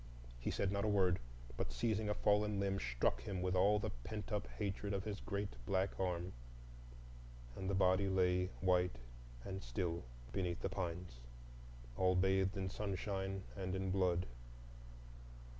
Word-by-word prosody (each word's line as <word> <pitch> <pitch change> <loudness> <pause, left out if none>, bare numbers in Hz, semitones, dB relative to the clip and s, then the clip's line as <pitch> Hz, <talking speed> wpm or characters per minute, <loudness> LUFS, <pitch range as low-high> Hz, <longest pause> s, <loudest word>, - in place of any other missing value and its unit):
He - - -2
said 100 - +1
not 100 0 0
a - - +2
word, 95 -4 +4 0.4
but, - - -1
seizing 110 -2 0
a 105 - +1
fallen 105 0 +3
limb, 95 0 +1
struck - - +1
him 90 +7 -3
with 90 0 +1
all 100 +3 +5
the 105 - -1
pent 105 - -6
up 105 -1 0
hatred 100 0 -1
of 95 - -1
his 105 -1 -3
great 100 0 -4
black 95 -1 +2
arm, 90 -1 -1 1.2
and 95 0 -3
the 100 - +1
body 95 +1 +4
lay 90 -1 +3
white 90 -4 +3 0.5
and 95 0 -4
still 85 +8 -2 0.3
beneath 90 -3 -1
the - - +1
pines, 90 -7 -4 0.8
all 95 0 +4
bathed 95 +2 +3
in 95 -1 -1
sunshine 95 -1 -2
and 95 -1 -2
in 95 0 -1
blood. 90 -2 +2
95 Hz, 155 wpm, -39 LUFS, 90-100 Hz, 1.2 s, all